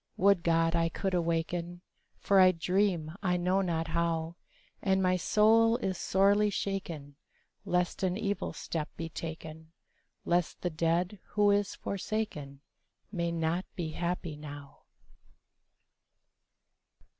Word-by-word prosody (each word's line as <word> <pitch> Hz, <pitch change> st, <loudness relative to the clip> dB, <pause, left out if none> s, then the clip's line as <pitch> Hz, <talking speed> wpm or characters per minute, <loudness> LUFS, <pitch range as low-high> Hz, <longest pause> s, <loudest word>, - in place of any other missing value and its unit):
Would 200 Hz, 0 st, +5 dB
to 170 Hz, -, -1 dB
God 165 Hz, 0 st, +3 dB
I 165 Hz, 0 st, +2 dB
could 190 Hz, +3 st, -2 dB
awaken! 170 Hz, +1 st, -1 dB, 0.4 s
For 200 Hz, -1 st, +3 dB
I 185 Hz, 0 st, +7 dB
dream 180 Hz, -2 st, 0 dB
I 180 Hz, -3 st, +1 dB
know 180 Hz, +2 st, +2 dB
not 165 Hz, -3 st, -1 dB
how, 165 Hz, 0 st, -1 dB, 0.5 s
And 190 Hz, -1 st, +2 dB
my 185 Hz, -1 st, +3 dB
soul 225 Hz, +5 st, +4 dB
is 190 Hz, -6 st, -2 dB
sorely 200 Hz, +4 st, +3 dB
shaken 170 Hz, -8 st, -4 dB, 0.5 s
Lest 180 Hz, -1 st, 0 dB
an 185 Hz, -1 st, 0 dB
evil 205 Hz, -2 st, -2 dB
step 155 Hz, -3 st, -4 dB
be 165 Hz, 0 st, -4 dB
taken,— 160 Hz, 0 st, -7 dB, 0.5 s
Lest 175 Hz, -1 st, 0 dB
the 180 Hz, -, -1 dB
dead 170 Hz, +5 st, 0 dB, 0.2 s
who 205 Hz, -1 st, +5 dB
is 205 Hz, 0 st, +1 dB
forsaken 185 Hz, -9 st, -4 dB, 0.5 s
May 170 Hz, -4 st, -1 dB
not 165 Hz, +2 st, 0 dB
be 170 Hz, -3 st, -3 dB
happy 170 Hz, -1 st, -3 dB
now. 145 Hz, -2 st, -10 dB
175 Hz, 125 wpm, -30 LUFS, 165-195 Hz, 0.5 s, I